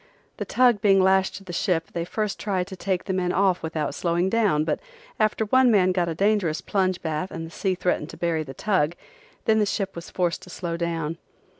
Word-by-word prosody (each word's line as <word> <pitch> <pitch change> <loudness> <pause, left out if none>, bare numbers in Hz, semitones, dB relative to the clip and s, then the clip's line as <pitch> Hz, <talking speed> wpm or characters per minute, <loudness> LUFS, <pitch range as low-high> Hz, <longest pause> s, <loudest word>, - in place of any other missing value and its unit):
The - - -3
tug 245 -5 +3
being 195 -2 +5
lashed 190 0 +3
to 195 - -9
the 180 -2 -8
ship 170 -2 0
they 170 -1 -2
first 210 +2 -2
tried 190 -3 -1
to 190 0 -8
take 185 0 -2
the 190 - -3
men 180 -1 0
off 190 -1 +2
without 160 -2 -2
slowing 175 +2 0
down 205 -9 +2
but 155 - -1 0.4
after 215 0 +2
one 260 +3 +4
man 190 -5 +4
got 175 -2 0
a 165 - -3
dangerous 195 -4 +1
plunge 185 -2 0
bath 160 +3 -2
and 165 0 -6
the 165 - -10
sea 190 0 -1
threatened 180 -4 -1
to - - -10
bury 170 -2 0
the 135 -3 -8
tug 175 -5 +1 0.5
then 220 -1 +4
the 210 - +3
ship 195 0 -2
was 170 0 -8
forced 175 -2 -1
to - - -13
slow 175 -1 -4
down. 165 -1 -2
185 Hz, 225 wpm, -25 LUFS, 170-200 Hz, 0.5 s, being